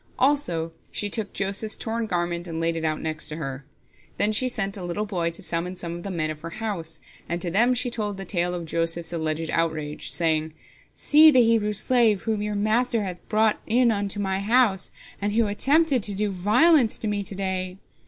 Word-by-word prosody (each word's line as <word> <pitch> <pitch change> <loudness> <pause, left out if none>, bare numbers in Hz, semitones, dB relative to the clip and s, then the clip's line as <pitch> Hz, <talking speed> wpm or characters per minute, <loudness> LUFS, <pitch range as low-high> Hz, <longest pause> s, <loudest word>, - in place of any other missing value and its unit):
Also 180 - +1 0.2
she 205 -1 0
took 215 -2 -1
Joseph's 200 +2 0
torn 225 0 -3
garment, 175 -2 -2
and 165 -1 -5
laid 165 0 0
it 165 - -4
out 155 -1 -1
next 155 -1 -1
to 155 - -5
her. 135 -3 -6 0.5
Then 210 - +3
she 255 +4 +2
sent 200 -5 -1
a 190 - -7
little 175 +5 -3
boy 175 -5 -1
to 170 +4 -5
summon 175 +1 -1
some 170 -1 -5
of 175 - -7
the 195 - -6
men 155 -4 -2
of 155 0 -9
her 165 - -6
house, 195 -8 -4 0.3
and 170 +1 -2
to 175 -1 -3
them 240 +7 +3
she 245 0 0
told 210 -4 -3
the 195 - -6
tale 175 -1 0
of 170 -1 -5
Joseph's 165 +1 -1
alleged 160 0 -2
outrage, 155 -3 -2
saying: 160 -2 0 0.4
"See 310 +2 +6
the 255 -5 +5
Hebrew 225 -2 +2
slave, 225 -2 +2
whom 220 -2 -1
your 210 0 -3
master 220 +2 +1
hath 180 -2 -5
brought 215 0 +2
in 235 +1 +3
unto 205 -1 -2
my 190 -1 -1
house, 210 -2 +2 0.3
and 205 +1 -1
who 230 +1 +3
attempted 275 +6 +2
to 200 0 0
do 205 +1 -1
violence 230 - +3
to 220 - -4
me 205 -1 -1
to 195 - -7
day! 185 -1 -3
195 Hz, 210 wpm, -24 LUFS, 170-220 Hz, 0.5 s, See